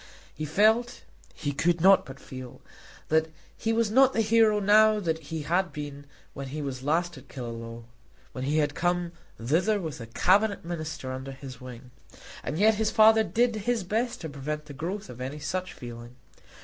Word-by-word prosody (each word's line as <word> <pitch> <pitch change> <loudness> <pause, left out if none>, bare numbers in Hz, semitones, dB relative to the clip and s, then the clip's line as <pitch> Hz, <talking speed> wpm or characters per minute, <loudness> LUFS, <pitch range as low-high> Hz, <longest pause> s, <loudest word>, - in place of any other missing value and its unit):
He 155 - -4
felt, 220 +9 +2 0.3
he 145 - -3
could 165 +5 +1
not 190 -3 +6
but 135 0 -10
feel, 130 -2 -9 0.5
that 160 +1 +3 0.3
he 225 - -1
was 225 -2 +1
not 265 +3 +5
the 225 - +2
hero 220 -1 +4
now 215 +1 +5
that 165 -5 -1
he 160 0 -4
had 175 +3 +1
been 145 -1 -7 0.3
when 140 0 -6
he 145 +4 -5
was 135 -3 -4
last 165 +2 0
at - - -19
Killaloe, 115 -2 -7 0.5
when 130 0 -5
he 150 +3 +1
had 145 -1 +1
come 175 +1 0 0.3
thither 170 - +1
with 160 -9 -5
a 115 - -7
Cabinet 195 - +2
Minister 155 -6 -5
under 130 +1 -6
his 130 -2 -10
wing. 125 0 -10 0.5
And 150 - -3
yet 215 +4 +5
his 215 - +2
father 220 0 +6
did 235 +1 +1
his 225 0 -1
best 230 +6 -1
to 160 - -5
prevent 150 +2 -5
the 145 - -10
growth 185 +9 -4
of 125 - -10
any 135 +4 -4
such 185 +5 -3
feeling. 120 0 -10
160 Hz, 185 wpm, -27 LUFS, 135-210 Hz, 0.5 s, not